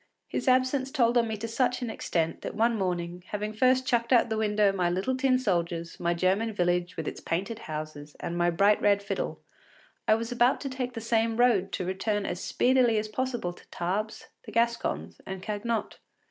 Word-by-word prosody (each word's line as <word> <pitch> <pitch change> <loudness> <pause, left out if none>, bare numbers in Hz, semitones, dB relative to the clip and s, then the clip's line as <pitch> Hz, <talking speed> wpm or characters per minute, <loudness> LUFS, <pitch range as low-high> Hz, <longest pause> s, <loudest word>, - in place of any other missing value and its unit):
His - - -3
absence 255 +1 +3
told 245 -4 +2
on 235 -1 +4
me 220 -1 -3
to 225 +3 -4
such 250 +2 0
an 235 - -2
extent 165 -6 -1
that - - -5
one 230 +2 +2
morning, 180 -3 -2
having 210 +1 -3
first 255 +3 +3
chucked 235 -1 +1
out 245 -3 +7
of - - -12
the 220 - -1
window 210 -2 +3
my 180 -3 0
little 190 +9 0
tin 260 -1 +3
soldiers, 170 -7 -1
my 170 0 +1
German 195 +6 +1
village 175 -1 0
with - - -3
its - - -5
painted 195 +7 -2
houses, 155 -4 -7
and 170 - -4
my 175 0 +2
bright 200 +5 +3
red 200 -1 +3
fiddle, - - -3 0.7
I 215 - +6
was 230 +1 -4
about 245 +1 +3
to 275 - -3
take 255 -1 -3
the 225 - -4
same 225 0 +1
road 220 -6 +3
to 185 - -2
return 200 +2 -1
as 175 - -3
speedily 250 -3 +3
as 215 0 -1
possible 240 -6 -2
to - - -18
Tarbes, 200 +5 -3 0.2
the - - -10
Gascons, 160 - -1
and 190 -1 -6
Cagnotte. 215 +2 -3
215 Hz, 200 wpm, -28 LUFS, 180-240 Hz, 0.7 s, out